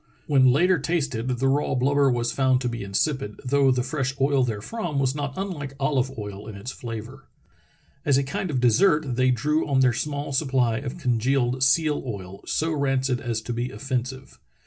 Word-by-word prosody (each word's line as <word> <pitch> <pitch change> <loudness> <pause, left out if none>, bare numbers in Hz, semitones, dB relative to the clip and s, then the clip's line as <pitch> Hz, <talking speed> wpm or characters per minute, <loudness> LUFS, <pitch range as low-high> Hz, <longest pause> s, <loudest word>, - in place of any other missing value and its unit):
When 130 -3 +5
later 175 +6 +3
tasted 140 -7 -1
the 130 +1 0
raw 140 0 +1
blubber 140 +2 +3
was 120 -1 0
found 130 -2 +2
to 125 - -1
be 120 -2 -4
insipid, 105 +3 -1
though 140 +1 +3
the 125 -1 +2
fresh 135 -1 -2
oil 135 -1 +3
therefrom 140 - -3
was 135 -1 +1
not 140 -2 -4
unlike 165 -8 -4
olive 135 -2 0
oil 105 0 -7
in 110 - -8
its 100 +6 -6
flavor. 120 +3 -8 0.8
As 140 -2 +3
a 140 - +2
kind 145 +7 -3
of 135 -4 0
dessert 140 - +3
they 130 +1 +3
drew 150 +6 +1
on 135 -2 +2
their 125 -2 +4
small 145 +3 -3
supply 130 -5 +1
of 140 +3 -6
congealed 125 -2 +1
seal 150 +3 +3
oil, 100 -6 -7
so 160 +1 0
rancid 135 -4 0
as 115 -2 -2
to 120 - -4
be 120 +2 -2
offensive. 130 0 -4
130 Hz, 185 wpm, -25 LUFS, 120-145 Hz, 0.8 s, When